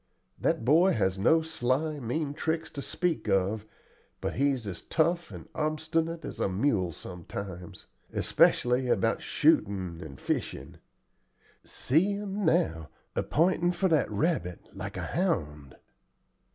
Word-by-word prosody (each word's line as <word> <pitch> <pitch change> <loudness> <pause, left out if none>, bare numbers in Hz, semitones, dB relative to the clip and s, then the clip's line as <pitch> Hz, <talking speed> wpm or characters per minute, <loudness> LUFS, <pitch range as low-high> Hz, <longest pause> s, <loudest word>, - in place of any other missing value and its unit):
That 115 - 0
boy 165 +8 +5
has 95 -3 0
no 160 +11 +4
sly, 155 0 -1
mean 140 +4 -2
tricks 160 +2 -2
to 140 - -5
speak 170 -6 -1
of, 100 +3 +1 0.5
but - - -2
he's 135 -3 +1
as 95 -4 -6
tough 170 +2 +1
and - - -10
obstinate 160 +2 -1
as - - -7
a - - +1
mule 95 -3 +1
sometimes, 90 +2 -8 0.3
especially 125 +1 +3
about 120 -6 +1
shooting 95 -5 +1
and 70 -4 -9
fishing. - - -3 0.9
See 165 +10 +1
him 200 0 -3
now 160 - +1 0.3
a - - +2
p'intin' 175 +2 +2
for 185 +2 +1
that 155 -4 +3
rabbit, 90 - -1
like - - -6
a - - -3
hound." 75 - -2
140 Hz, 130 wpm, -29 LUFS, -, 0.9 s, boy